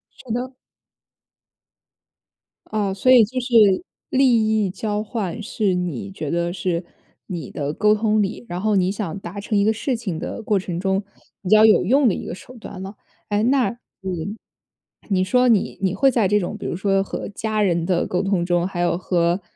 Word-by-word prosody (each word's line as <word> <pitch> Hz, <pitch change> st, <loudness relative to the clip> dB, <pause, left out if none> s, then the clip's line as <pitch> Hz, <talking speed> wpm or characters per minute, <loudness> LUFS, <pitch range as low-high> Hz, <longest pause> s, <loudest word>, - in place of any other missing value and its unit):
是 245 Hz, -, -10 dB
的。 250 Hz, +2 st, -3 dB, 2.1 s
哦， 205 Hz, -3 st, -1 dB
所 255 Hz, +7 st, +2 dB
以 245 Hz, -3 st, +8 dB
就 255 Hz, +5 st, -2 dB
是 230 Hz, -, +4 dB, 0.3 s
利 255 Hz, -4 st, +4 dB, 0.2 s
益 -, -, -1 dB
交 210 Hz, +2 st, -2 dB
换 215 Hz, -3 st, -4 dB
是 210 Hz, -2 st, 0 dB
你 180 Hz, 0 st, -3 dB
觉 155 Hz, -6 st, -5 dB
得 170 Hz, 0 st, 0 dB
是 175 Hz, -1 st, -2 dB, 0.4 s
你 170 Hz, -8 st, -5 dB
的 145 Hz, 0 st, -3 dB
沟 210 Hz, +4 st, +3 dB
通 215 Hz, 0 st, +2 dB
里 210 Hz, +4 st, -3 dB
然 175 Hz, +1 st, -3 dB
后 215 Hz, 0 st, +1 dB
你 185 Hz, -1 st, +2 dB
想 200 Hz, -3 st, -4 dB
达 195 Hz, +2 st, -7 dB
成 210 Hz, +1 st, -1 dB
一 200 Hz, -, +3 dB
个 215 Hz, -, +3 dB
事 240 Hz, +4 st, -1 dB
情 195 Hz, -9 st, -4 dB
的 200 Hz, -, -5 dB
过 205 Hz, -2 st, +1 dB
程 175 Hz, -2 st, -4 dB
中 190 Hz, +1 st, 0 dB, 0.4 s
比 185 Hz, -, -5 dB
较 215 Hz, +1 st, +7 dB
有 215 Hz, -, +5 dB
用 265 Hz, +6 st, +4 dB
的 205 Hz, -, +3 dB
一 -, -, -5 dB
个 -, -, -5 dB
手 255 Hz, +6 st, -13 dB
段 195 Hz, -4 st, -9 dB
了。 195 Hz, +2 st, -7 dB, 0.3 s
诶 205 Hz, +1 st, +1 dB
那 255 Hz, +1 st, +3 dB, 0.3 s
嗯， 190 Hz, +3 st, -4 dB, 0.7 s
你 185 Hz, -2 st, +2 dB
说 250 Hz, +6 st, +3 dB
你 225 Hz, -5 st, +2 dB
你 190 Hz, -2 st, +1 dB
会 270 Hz, +6 st, +4 dB
在 225 Hz, -5 st, +2 dB
这 205 Hz, +2 st, +3 dB
种 180 Hz, -, -4 dB
比 -, -, -8 dB
如 -, -, -2 dB
说 195 Hz, +1 st, +1 dB
和 -, -, -5 dB
家 215 Hz, +1 st, -2 dB
人 170 Hz, -4 st, +1 dB
的 180 Hz, -1 st, +1 dB
沟 180 Hz, -, 0 dB
通 195 Hz, -3 st, 0 dB
中， 175 Hz, 0 st, +1 dB
还 185 Hz, -2 st, -6 dB
有 175 Hz, -1 st, +1 dB
和 175 Hz, 0 st, 0 dB
200 Hz, 210 characters per minute, -22 LUFS, 180-220 Hz, 2.1 s, 以